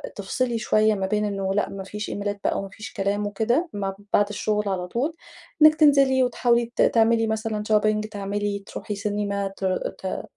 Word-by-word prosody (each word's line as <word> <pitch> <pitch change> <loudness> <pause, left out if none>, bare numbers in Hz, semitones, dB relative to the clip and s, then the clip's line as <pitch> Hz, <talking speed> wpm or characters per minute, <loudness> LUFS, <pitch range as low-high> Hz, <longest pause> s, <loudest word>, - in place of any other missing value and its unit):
تفصلي 235 +4 -1
شويّة 215 0 +3
ما 195 -1 -2
بين 210 +1 0
إنّه 195 -2 -2
لأ 205 - 0
ما 195 -1 -6
فيش 210 +2 -6
إيميلات 205 0 -3
بقى - - 0
وما 195 - -6
فيش 210 +2 -10
كلام 200 +1 -1
وكده 235 - 0
م 200 -1 -2 0.2
بعد 205 0 +4
الشغل 210 0 -1
على 180 -2 -2
طول، 255 - -1 0.5
إنِّك 310 0 +8
تنزلي 275 -4 +5
وتحاولي 240 -1 +1
ت - - +1
تعملي 225 0 +3
مثلًا 220 -1 -2
شوبينج 215 0 +2
تعملي 205 0 -3
تروحي 210 - -5
سينما 200 -1 -2
ت 195 - -3 0.3
ت 190 - -4
210 Hz, 180 wpm, -24 LUFS, 200-230 Hz, 0.5 s, إنِّك